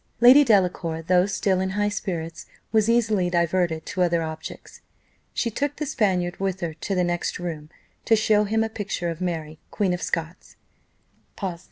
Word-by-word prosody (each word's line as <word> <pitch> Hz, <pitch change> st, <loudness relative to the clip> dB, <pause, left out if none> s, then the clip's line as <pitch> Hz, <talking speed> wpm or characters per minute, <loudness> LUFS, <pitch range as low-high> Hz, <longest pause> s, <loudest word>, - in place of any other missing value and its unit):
Lady 255 Hz, +5 st, +8 dB
Delacour, 180 Hz, -, +1 dB
though 180 Hz, +2 st, +3 dB
still 190 Hz, -1 st, 0 dB
in 190 Hz, 0 st, -1 dB
high 205 Hz, 0 st, +2 dB
spirits, 170 Hz, -5 st, -4 dB, 0.2 s
was 220 Hz, 0 st, +3 dB
easily 215 Hz, -6 st, +2 dB
diverted 170 Hz, -2 st, 0 dB
to 185 Hz, -, -3 dB
other 170 Hz, -2 st, +2 dB
objects. 160 Hz, 0 st, -8 dB, 0.5 s
She 230 Hz, -, -1 dB
took 285 Hz, +5 st, -2 dB
the 300 Hz, -, -3 dB
Spaniard 185 Hz, -9 st, 0 dB
with 190 Hz, -1 st, -2 dB
her 170 Hz, -2 st, -2 dB
to 190 Hz, +5 st, -4 dB
the 180 Hz, -, +2 dB
next 175 Hz, 0 st, -1 dB
room, 160 Hz, -4 st, -6 dB, 0.4 s
to 225 Hz, -, +5 dB
show 215 Hz, -1 st, +3 dB
him 220 Hz, +2 st, +1 dB
a -, -, 0 dB
picture 200 Hz, -5 st, -3 dB
of 165 Hz, +1 st, -8 dB
Mary, 160 Hz, -3 st, -3 dB
Queen 195 Hz, -4 st, 0 dB
of 180 Hz, -, -3 dB
Scots. 165 Hz, +1 st, -4 dB
185 Hz, 170 wpm, -24 LUFS, 170-210 Hz, 0.5 s, Lady